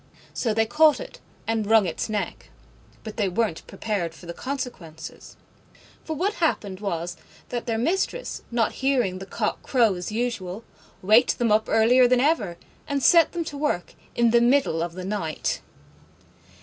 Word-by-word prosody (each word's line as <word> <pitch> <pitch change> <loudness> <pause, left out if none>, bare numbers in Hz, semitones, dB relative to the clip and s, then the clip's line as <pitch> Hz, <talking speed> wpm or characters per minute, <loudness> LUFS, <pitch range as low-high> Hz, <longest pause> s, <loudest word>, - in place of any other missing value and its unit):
So 230 - 0
they 225 +1 +2
caught 305 +6 +4
it - - -9 0.3
and 225 -2 -1
wrung 220 -2 +5
its 170 +5 -3
neck. 210 -1 -4 0.5
But 220 - -8
they 205 -3 +1
weren't 195 -2 -1
prepared 180 -7 -3
for 175 - -14
the 170 - -6
consequences. 185 - -7 0.7
For 320 - -4
what 385 +7 0
happened 200 - 0
was 175 -4 -3 0.3
that 240 0 -4
their 225 -1 0
Mistress, 380 - -1
not 235 -2 +1
hearing 245 -9 0
the 195 - -8
cock - - -2
crow 235 -6 +3
as 180 +2 -5
usual, 220 -3 -3 0.4
waked 215 +6 +5
them 235 -3 +1
up 215 +1 +3
earlier 245 +3 +5
than 250 0 +3
ever, 240 - +1 0.3
and 280 -2 -1
set 335 +5 +6
them 345 -1 -1
to 300 -3 -7
work 295 -12 -1 0.2
in 235 -1 +3
the 235 0 +5
middle 240 - +3
of 170 0 -3
the 185 0 -6
night. 190 -6 -2
225 Hz, 165 wpm, -25 LUFS, 190-260 Hz, 0.7 s, set